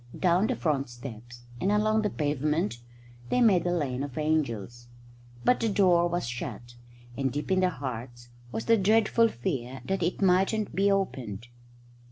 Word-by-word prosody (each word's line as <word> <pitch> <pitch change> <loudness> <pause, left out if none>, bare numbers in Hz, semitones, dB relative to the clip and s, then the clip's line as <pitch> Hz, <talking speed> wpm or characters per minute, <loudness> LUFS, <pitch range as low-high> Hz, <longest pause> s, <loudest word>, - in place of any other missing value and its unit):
Down 180 +3 +3
the - - 0
front 140 -6 -1
steps 120 -1 -10 0.2
and 195 - +1
along 215 +1 +2
the 210 - 0
pavement 150 -1 -1 0.5
they 250 - +2
made 195 -8 +4
a - - +1
lane 140 -7 -1
of 140 -3 -6
angels. 120 -7 -1 0.6
But 250 - +4
the 225 - +1
door 180 -4 +4
was 175 -6 -2
shut, 120 0 -6 0.4
and 135 0 -1
deep 150 +7 -4
in 190 - +3
their 185 -1 +3
hearts 120 -5 -7 0.2
was 110 0 -4
the 230 - +5
dreadful 220 +3 +4
fear 135 - -4
that 195 -1 -1
it 175 +2 -1
mightn't 195 +3 +2
be 200 +1 +2
opened. 120 - -2
155 Hz, 165 wpm, -28 LUFS, 125-195 Hz, 0.6 s, the